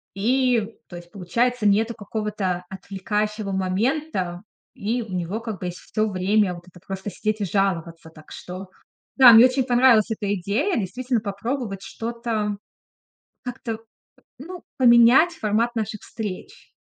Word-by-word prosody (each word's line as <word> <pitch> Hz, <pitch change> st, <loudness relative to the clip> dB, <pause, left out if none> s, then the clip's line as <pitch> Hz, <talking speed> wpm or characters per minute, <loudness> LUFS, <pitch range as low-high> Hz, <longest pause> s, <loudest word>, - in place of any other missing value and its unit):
и 235 Hz, 0 st, +1 dB
то 175 Hz, -, -10 dB
есть 175 Hz, 0 st, -11 dB
получается 230 Hz, +4 st, 0 dB
нету 220 Hz, +3 st, +2 dB
какого-то 205 Hz, -4 st, -3 dB
отвлекающего 210 Hz, +2 st, -3 dB
момента, 190 Hz, -, -1 dB, 0.3 s
и 230 Hz, +4 st, -2 dB
у 210 Hz, -4 st, -9 dB
него 180 Hz, +4 st, -2 dB
как 225 Hz, -4 st, -6 dB
бы 180 Hz, -, -4 dB
есть 175 Hz, 0 st, -6 dB
всё 215 Hz, +2 st, -2 dB
время 190 Hz, 0 st, +1 dB
вот 175 Hz, +1 st, -13 dB
это 180 Hz, 0 st, -16 dB
просто 195 Hz, +1 st, -5 dB
сидеть 215 Hz, +3 st, -2 dB
и -, -, +1 dB
жаловаться. 170 Hz, -4 st, -1 dB
Так 155 Hz, -1 st, -17 dB
что 185 Hz, +1 st, -8 dB, 0.5 s
да, 255 Hz, -3 st, +9 dB
мне 225 Hz, +2 st, +9 dB
очень 255 Hz, +1 st, +2 dB
понравилась 245 Hz, -3 st, +4 dB
эта 205 Hz, -2 st, -2 dB
идея, 205 Hz, -, -1 dB
действительно 240 Hz, +4 st, -1 dB
попробовать 205 Hz, 0 st, -4 dB
что-то, 225 Hz, -3 st, -3 dB, 0.9 s
как-то, 240 Hz, -3 st, -5 dB, 0.6 s
ну, 350 Hz, +6 st, -9 dB
поменять 245 Hz, +5 st, +6 dB
формат 230 Hz, -2 st, 0 dB
наших 215 Hz, -2 st, -3 dB
встреч. 210 Hz, -5 st, -7 dB
215 Hz, 140 wpm, -23 LUFS, 190-235 Hz, 0.9 s, да